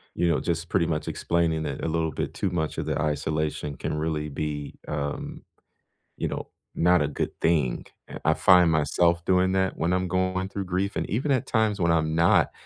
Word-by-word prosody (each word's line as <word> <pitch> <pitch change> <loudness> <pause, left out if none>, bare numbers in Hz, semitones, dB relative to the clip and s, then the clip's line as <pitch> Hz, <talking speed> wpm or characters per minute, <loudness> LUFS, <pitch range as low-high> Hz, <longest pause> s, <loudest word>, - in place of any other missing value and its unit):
you 85 - +1
know, 75 - +2
just 85 0 -2
pretty 90 -4 +2
much 80 -2 -2
explaining 85 -2 0
that 70 -3 -4
a - - 0
little 80 -1 0
bit - - -4
too 95 - -1
much 80 -3 -2
of - - -2
the - - -1
isolation 75 -1 -2
can - - -4
really 75 -1 -2
be, 75 0 -4
um, 70 -1 -4 0.8
you - - -1
know, - - -5 0.3
not 90 -1 +4
a 70 - +1
good 75 - -3
thing, 75 -7 +1 0.2
eh, - - -8
I 80 - +4
find 90 -3 +6
myself 85 +3 +2
doing 95 0 +3
that 95 0 0
when 85 +2 0
I'm 90 0 0
going 95 +1 0
through 100 -2 -4
grief 95 +2 -1
and - - -2
even 135 +8 0
at 130 - +1
times 110 -3 +1
when 85 -1 +2
I'm 80 -1 +1
not, 85 +1 +4
85 Hz, 205 wpm, -26 LUFS, 75-90 Hz, 0.8 s, find